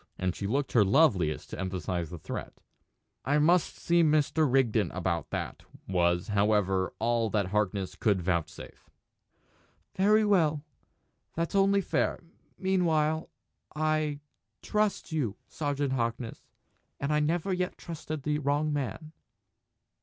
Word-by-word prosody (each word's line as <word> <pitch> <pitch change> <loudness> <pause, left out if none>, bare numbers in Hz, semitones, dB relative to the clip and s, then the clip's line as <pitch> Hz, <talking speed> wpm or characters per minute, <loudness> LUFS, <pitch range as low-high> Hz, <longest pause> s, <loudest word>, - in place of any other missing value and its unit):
And 90 -1 -1
she 100 - -3
looked 135 +5 -1
her 115 - +5
loveliest 95 - +2
to - - -6
emphasise 90 -3 -3
the 85 - -7
threat. - - -6 0.7
"I 145 +4 +2
must 170 +3 +3
see 170 0 +2
Mr. 155 -2 +2
Rigden 120 -5 +2
about 85 -3 -2
that," - - -4 0.3
was, 90 +1 +1
however, 100 -2 +2
all 115 0 +1
that 105 -3 +1
Harkness 100 -2 -1
would 105 -4 +3
vouchsafe. 85 -2 -4 1.1
"Very 210 +3 +4
well! 160 -8 +2 0.7
That's 165 +3 -2
only 195 0 +4
fair. - - -1 0.3
Meanwhile 160 -5 +1 0.5
I 155 -1 0 0.4
trust 210 -4 0
you, 125 -10 -1
Sergeant 145 -2 -2
Harkness. 115 -1 -3 0.5
And 140 +2 -1
I 150 - +3
never 170 +5 0
yet 180 0 -2
trusted 155 -3 -6
the 150 0 0
wrong 145 +1 0
man!" 145 +3 -4
140 Hz, 125 wpm, -29 LUFS, 100-160 Hz, 1.1 s, her